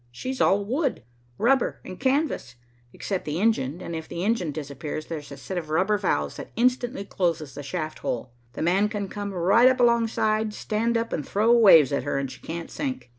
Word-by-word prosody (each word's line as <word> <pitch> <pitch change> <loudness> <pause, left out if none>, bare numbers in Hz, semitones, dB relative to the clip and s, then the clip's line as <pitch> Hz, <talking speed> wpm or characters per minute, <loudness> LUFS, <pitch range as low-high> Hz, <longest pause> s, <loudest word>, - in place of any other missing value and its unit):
She's 255 - -4
all 200 +1 +3
wood, 265 - -1 0.3
rubber 260 +2 +2
and 185 - -8
canvas, 265 - 0 0.4
except 190 +7 -4
the 150 +2 -3
engine, 180 - +1
and 170 - -5
if 160 0 -6
the 170 - -4
engine 195 -7 0
disappears 145 +1 -5
there's 150 -3 -7
a 140 - -8
set 185 -2 -4
of 160 -3 -9
rubber 190 +6 +2
valves 75 - -1
that - - -8
instantly 245 -2 +1
closes 165 -7 -1
the 145 - -7
shaft 155 +2 -4
hole. 125 0 -3 0.2
'The - - -4
man' 190 +5 +3
can 205 -2 -3
come 205 -1 -5
right 195 +7 +4
up 260 0 0
alongside, 220 -2 +2
stand 230 +2 0
up 230 0 -2
and 150 - -1
throw 215 +3 +2
waves 165 - +7
at 140 - +1
her, 145 - -2
and 135 -1 -2
she - - -12
can't 165 +1 -6
sink. 260 - -4
195 Hz, 200 wpm, -25 LUFS, 155-230 Hz, 0.4 s, waves